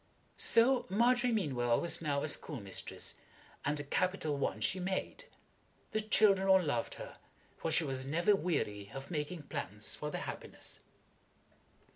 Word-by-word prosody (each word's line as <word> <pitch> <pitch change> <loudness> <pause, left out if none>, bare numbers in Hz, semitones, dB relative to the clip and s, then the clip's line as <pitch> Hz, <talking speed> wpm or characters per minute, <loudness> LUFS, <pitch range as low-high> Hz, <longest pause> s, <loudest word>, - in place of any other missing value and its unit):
So 245 +3 +5
Margery 240 +4 +3
Meanwell 130 - +1
was 170 - 0
now 145 -3 0
a - - -1
schoolmistress, 125 - -3 0.5
and 145 0 0
a - - -3
capital 160 0 0
one 140 - -1
she 190 - +1
made. 190 +1 -3 0.7
The 215 - +1
children 200 -2 +4
all 190 0 +7
loved 145 -9 -1
her, - - -9 0.4
for 165 - -3
she 165 - +3
was 135 -3 -1
never 170 +9 +3
weary 105 - -2
of 135 +3 -7
making 155 +1 -3
plans 105 -6 -2
for 150 - -4
their - - -4
happiness. - - -6
160 Hz, 145 wpm, -34 LUFS, 140-195 Hz, 0.7 s, all